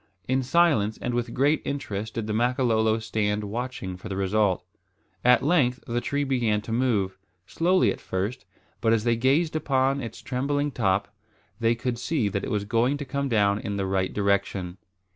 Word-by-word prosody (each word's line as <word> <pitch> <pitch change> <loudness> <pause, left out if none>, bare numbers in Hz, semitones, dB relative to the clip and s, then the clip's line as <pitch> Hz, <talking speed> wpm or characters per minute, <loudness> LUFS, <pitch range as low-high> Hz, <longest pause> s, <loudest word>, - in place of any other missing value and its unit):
In 130 +1 +2
silence 130 -7 +2
and 125 - -3
with 120 0 -1
intense 140 +6 +2
interest 110 -7 -4
did 115 - -2
the 105 - -2
Makololo 115 -2 +2
stand 105 -1 -1
watching 110 -3 -4
for 105 - -9
the 95 - -3
result. 100 0 +1 0.6
At 125 0 +5
length 135 -5 +2
the 120 +1 -1
tree 145 +3 -1
began 120 -6 +1
to 110 - -8
move; 105 -6 0 0.3
slowly 180 - +2
at - - -7
first, 100 +7 -3 0.4
but 115 -1 +3
as 110 -2 +1
they 120 0 +2
gazed 140 +7 +2
upon 135 -2 +1
its 115 - -7
trembling 145 +3 -1
top, 100 -3 0 0.5
they 115 0 +2
could 120 0 -3
see 130 -7 0
that 100 0 -3
it - - -3
was 105 -1 -1
going 120 +6 +1
to 145 - -5
come 140 +1 -2
down 100 -3 +2
in 100 -1 -4
the 100 - -1
right 95 -1 0
direction. 100 -3 -1
115 Hz, 180 wpm, -26 LUFS, 105-130 Hz, 0.6 s, At